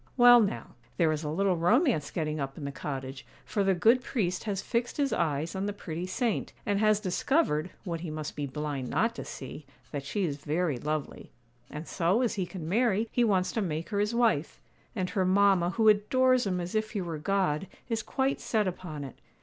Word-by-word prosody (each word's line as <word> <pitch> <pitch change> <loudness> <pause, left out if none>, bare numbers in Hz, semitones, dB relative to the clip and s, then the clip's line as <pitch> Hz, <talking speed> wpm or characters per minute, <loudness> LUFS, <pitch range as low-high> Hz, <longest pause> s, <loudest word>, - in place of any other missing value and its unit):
'Well, 245 -1 +9
now, 200 - -2 0.2
there 165 -3 +3
is 155 0 -2
a 150 - -2
little 190 +4 +1
romance 195 - +2
getting 155 -2 -2
up 135 -1 -4
in 145 - -6
the 140 - -3
cottage; 135 -1 -5 0.2
for 205 - 0
the 195 -1 +3
good 230 +8 +4
priest 185 -9 -2
has 200 -3 -1
fixed 235 +4 -2
his 280 -2 +1
eyes 160 +1 -1
on 190 +1 -1
the 205 - -2
pretty 175 -3 -5
saint, 220 +4 -1
and 205 -3 +1
has 215 -1 +4
discovered, 185 - +1
what 170 -4 -3
he 170 0 -5
must 155 -1 -5
be 145 -1 -3
blind 140 -2 -4
not 225 +1 +1
to - - -6
see, 135 +3 -8 0.3
that 145 -2 -4
she 165 +9 -2
is 145 -5 -1
very 155 0 -1
lovely. 150 +1 -4 0.4
And 150 +2 -7
so, 185 +7 +1
as 240 - +1
he 190 -3 -2
can 175 -5 -7
marry, 220 +2 +2
he 245 - +2
wants 190 -5 +2
to 225 - -1
make 165 -4 -3
her 205 -2 -1
his 210 +3 0
wife; 225 -11 +1 0.4
and 185 -3 -2
her 190 - +1
mamma, 190 -1 +4
who 220 +3 +1
adores 250 +3 +4
him 180 -2 0
as 175 0 -4
if 215 0 -1
he 205 - -1
were 165 -3 -4
God, 185 -1 0 0.2
is 225 -2 -1
quite 265 +4 -1
set 215 -3 +1
upon 175 -5 -5
it. 135 - -9
185 Hz, 215 wpm, -29 LUFS, 155-215 Hz, 0.4 s, Well